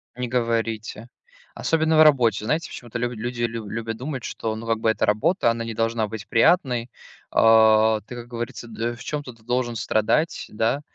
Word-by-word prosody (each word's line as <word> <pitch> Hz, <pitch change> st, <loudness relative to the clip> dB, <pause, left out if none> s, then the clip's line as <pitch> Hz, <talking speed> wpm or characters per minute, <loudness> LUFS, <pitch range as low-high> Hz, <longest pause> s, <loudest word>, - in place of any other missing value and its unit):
Не 125 Hz, 0 st, -3 dB
говорите. 115 Hz, -2 st, -2 dB, 0.5 s
Особенно 160 Hz, -1 st, +1 dB
в 155 Hz, -, +9 dB
работе. 120 Hz, -8 st, +3 dB
Знаете, 160 Hz, +7 st, -1 dB
почему-то 120 Hz, -1 st, -7 dB
лю 120 Hz, 0 st, -1 dB
люди 120 Hz, +2 st, -5 dB
лю 115 Hz, -2 st, -3 dB
любят 115 Hz, +1 st, -4 dB
думать, 130 Hz, 0 st, -5 dB
что, 110 Hz, -1 st, -4 dB
ну, 115 Hz, +1 st, -8 dB
как 115 Hz, -1 st, 0 dB
бы 110 Hz, -, +1 dB
эта -, -, 0 dB
работа, 115 Hz, -, +2 dB
она 115 Hz, 0 st, -3 dB
не 115 Hz, -, -4 dB
должна 115 Hz, -1 st, 0 dB
быть 110 Hz, -1 st, -8 dB
приятной. 125 Hz, -3 st, +2 dB, 0.4 s
А 110 Hz, -1 st, +5 dB
ты, 120 Hz, +3 st, -10 dB
как 120 Hz, 0 st, -8 dB
говорится, 120 Hz, 0 st, -6 dB
д 115 Hz, +1 st, -3 dB
в 115 Hz, -, -11 dB
чём-то 145 Hz, -4 st, -5 dB
ты 115 Hz, -1 st, -24 dB
должен 120 Hz, 0 st, -1 dB
страдать, 110 Hz, +9 st, 0 dB
да 115 Hz, +6 st, 0 dB
115 Hz, 185 wpm, -23 LUFS, 110-125 Hz, 0.5 s, в